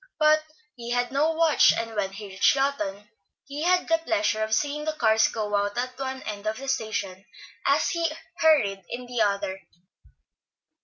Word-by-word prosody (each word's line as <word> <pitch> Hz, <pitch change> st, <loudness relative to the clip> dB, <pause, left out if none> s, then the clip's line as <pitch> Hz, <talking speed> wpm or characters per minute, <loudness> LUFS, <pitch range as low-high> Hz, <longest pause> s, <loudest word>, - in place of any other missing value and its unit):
But 310 Hz, -1 st, +4 dB, 0.3 s
he 235 Hz, -1 st, -8 dB
had 245 Hz, 0 st, 0 dB
no 290 Hz, +4 st, +2 dB
watch, 320 Hz, -2 st, +5 dB
and 230 Hz, -1 st, -4 dB
when 195 Hz, -2 st, -1 dB
he 205 Hz, +2 st, -8 dB
reached 190 Hz, +7 st, +3 dB
Lawton 210 Hz, -8 st, -2 dB, 0.4 s
he 285 Hz, +2 st, -6 dB
had 360 Hz, +2 st, +2 dB
the 330 Hz, 0 st, +3 dB
pleasure 320 Hz, -9 st, 0 dB
of 215 Hz, 0 st, -2 dB
seeing 290 Hz, +6 st, 0 dB
the 310 Hz, 0 st, -2 dB
cars 220 Hz, -6 st, +3 dB
go 210 Hz, -2 st, -3 dB
out 205 Hz, +2 st, -1 dB
at 255 Hz, +1 st, -2 dB
one 265 Hz, -1 st, -4 dB
end 210 Hz, 0 st, -6 dB
of 215 Hz, 0 st, -1 dB
the 275 Hz, -, -8 dB
station 205 Hz, -7 st, -3 dB, 0.4 s
as -, -, +3 dB
he 335 Hz, -2 st, 0 dB, 0.3 s
hurried 220 Hz, -, +3 dB
in 250 Hz, +1 st, -5 dB
at -, -, -13 dB
the 245 Hz, -2 st, -2 dB
other. 200 Hz, -2 st, 0 dB
245 Hz, 185 wpm, -25 LUFS, 210-300 Hz, 0.4 s, watch